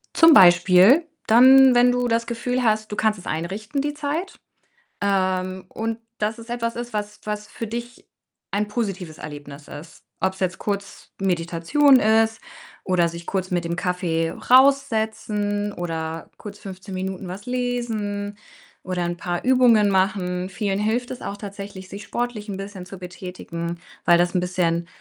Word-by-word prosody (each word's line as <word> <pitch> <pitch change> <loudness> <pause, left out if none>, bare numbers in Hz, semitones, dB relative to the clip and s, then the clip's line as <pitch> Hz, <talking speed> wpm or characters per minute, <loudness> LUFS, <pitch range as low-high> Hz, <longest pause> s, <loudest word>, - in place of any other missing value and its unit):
Zum 330 -1 +8
Beispiel 185 - +6 0.2
dann, 260 +3 +7
wenn 245 0 +5
du 245 0 0
das 230 0 0
Gefühl 245 +2 -2
hast, 215 -1 +1
du - - -3
kannst 215 0 +1
es 185 - -13
einrichten 195 - -3
die 295 +1 -2
Zeit, 300 +5 -4 0.6
ähm, 185 -2 0
und, 225 +1 -4 0.2
dass 215 +1 -1
es 230 +1 -12
etwas 230 -1 -2
ist, 240 0 -6
was 210 0 -4
was 210 0 -4
für 230 - -6
dich 240 +3 -7 0.4
ein 205 +1 0
positives 195 -7 -4
Erlebnis 145 -1 -9
ist. 155 +3 -11 0.2
Ob's 190 0 -1
jetzt 185 -1 -1
kurz 200 -1 -5
Meditation 190 - +3
ist 225 +1 +3 0.5
oder 175 -2 +2
sich 170 +1 -9
kurz 185 -1 -3
mit 175 -1 0
dem 170 0 -2
Kaffee 175 -2 -1
raus 275 +2 +5
setzen 210 -2 -2
oder 165 -2 -5
kurz 205 -1 -10
15 190 0 -9
Minuten 190 0 -4
was 190 +4 -8
lesen 225 -5 -3 0.5
oder 180 -1 -2
'n 175 0 -3
paar 175 0 -3
Übungen 245 -5 +5
machen. 185 -2 0
Vielen 195 +1 -2
hilft 230 +4 -1
es 255 - -7
auch 200 - -5
tatsächlich, 200 -2 -8
sich 200 +1 -8
sportlich 230 0 -4
'n 200 - -4
bisschen 195 -2 -7
zu 190 +1 -10
betätigen, 175 -2 -6 0.3
weil 175 - +6
das 175 0 +1
'n 180 - +2
bisschen 175 -2 0
200 Hz, 160 wpm, -23 LUFS, 180-230 Hz, 0.6 s, Zum